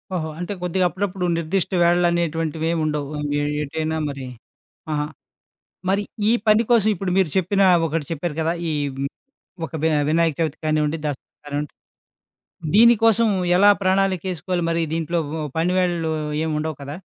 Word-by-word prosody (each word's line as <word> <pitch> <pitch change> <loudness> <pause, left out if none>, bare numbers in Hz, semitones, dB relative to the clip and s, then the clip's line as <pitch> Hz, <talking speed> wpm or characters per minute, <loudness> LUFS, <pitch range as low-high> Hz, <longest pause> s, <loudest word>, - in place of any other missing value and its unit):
ఓహో! 160 -3 -2
అంటే 180 +3 -3
కొద్దిగా 180 +1 0
అప్పుడప్పుడు 190 0 -3
నిర్దిష్ట 170 +2 -1
వేళలు 175 +1 +4
అనేటువంటివేమి 165 -1 -1
ఉండవు. 150 -2 -2 0.5
ఏటైనా 160 +2 -2
మరి? 135 -2 -6 0.7
ఆహా! 150 0 0 0.8
మరి 200 +2 +2 0.3
ఈ - - +5 0.2
పని 215 +2 +5
కోసం 220 -3 +4
ఇప్పుడు 185 0 -3
మీరు 190 -4 +3
చెప్పిన 190 +2 +1 0.3
ఒకటి 155 -1 -2
చెప్పారు 165 0 -3
కదా! 165 +1 +1 0.2
ఈహ్, 145 -2 -1
హ్మ్. 140 - -1 0.6
ఒక - - -13
వి 160 - +4 0.2
వినాయక 165 -1 +2
చవితి 160 -2 -1
కానివ్వండి, 155 0 +1
దసరా 145 -3 -4 0.2
కానివ్వండి, 145 0 -4 1.0
దీనికోసం 225 0 +5 0.3
ఎలా 200 +2 +7
ప్రణాళికేసుకోవాలి? 185 -2 0
మరి 165 0 0
దీంట్లో 165 +1 -1 0.4
పనివేళలు 175 -1 +1 0.3
ఏమి 160 - -1
ఉండవు 155 -2 -4
కదా? 140 +2 -6
165 Hz, 135 wpm, -22 LUFS, 155-185 Hz, 1.0 s, ఎలా